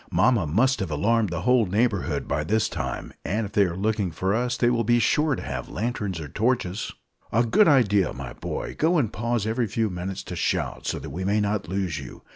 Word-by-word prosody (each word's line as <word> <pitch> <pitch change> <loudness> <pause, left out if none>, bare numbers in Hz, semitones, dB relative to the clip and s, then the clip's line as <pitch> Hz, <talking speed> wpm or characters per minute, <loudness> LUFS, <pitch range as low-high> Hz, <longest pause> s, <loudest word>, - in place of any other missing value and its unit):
Mamma 115 -8 +3
must 130 - +2
have 95 - -2
alarmed 105 +8 +1
the 85 -1 -3
whole 125 -2 +3
neighbourhood 100 -7 0
by 75 +1 0
this 110 +6 +1
time; - - -4
and 105 +5 -1
if 100 - -7
they 100 - +4
are 85 -2 -3
looking 105 -1 0
for 95 +4 -1
us, 120 +2 0
they 120 0 +3
will 115 -1 +1
be 120 +2 +3
sure 150 +4 +2
to - - -7
have 65 -2 -5
lanterns 105 -6 -3
or 75 - -6
torches." 105 - -1 0.4
"A 115 - +3
good 205 - +4
idea, 105 - +4
my 60 -2 -7
boy. - - -5
Go, 170 +3 +3
and 120 -9 0
pause 115 -1 -1
every 115 +1 0
few 110 +1 -1
minutes 90 +2 -5
to - - -6
shout, - - -1
so - - -1
that - - -7
we 90 +6 -4
may 100 +3 +2
not 105 -3 -1
lose 95 -4 -2
you. - - -10
105 Hz, 225 wpm, -25 LUFS, 90-120 Hz, 0.4 s, they